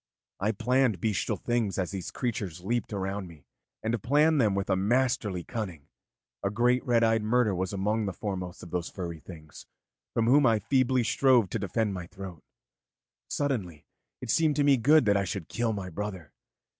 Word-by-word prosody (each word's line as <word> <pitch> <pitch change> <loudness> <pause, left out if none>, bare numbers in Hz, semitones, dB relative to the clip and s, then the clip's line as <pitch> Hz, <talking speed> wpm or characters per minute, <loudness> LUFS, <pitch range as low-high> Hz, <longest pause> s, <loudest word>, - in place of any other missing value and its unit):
I 105 +3 +1
planned 120 -1 +1
bestial 105 +1 -1
things 120 -4 -1
as 95 -2 -1
these 95 -3 -5
creatures 100 -9 -3
leaped 115 +6 -2
around 95 -1 -3
me, 80 -5 -15 0.4
and 110 0 -1
planned 150 +4 +3
them 105 -4 +2
with 100 0 -1
a - - +4
masterly 105 -3 +1
cunning. 90 - -6 0.5
A 100 - +1
great 120 +4 +2
red 120 -2 +2
eyed 115 -1 +3
murder 110 -1 +2
was 95 0 -2
among 105 +2 0
the - - -1
foremost 90 -2 -5
of 85 - -10
those 90 -2 -2
furry 85 -4 -6
things 80 -4 -12 0.5
from 115 - +2
whom 140 +5 +5
I 115 -1 +4
feebly 130 +3 +2
strove 115 -2 +3
to 115 - -1
defend 100 +2 -1
my 90 -2 -6
throat. 95 -4 -9 0.9
Suddenly 105 - -2 0.4
it 125 -3 -2
seemed 160 -3 +3
to 145 - +2
me 140 -1 +5
good 145 +4 +5
that 100 -1 +4
I 100 - +1
should 95 -3 -4
kill 115 -1 -1
my 95 -4 -5
brother. 95 -3 -6
105 Hz, 180 wpm, -28 LUFS, 95-120 Hz, 0.9 s, whom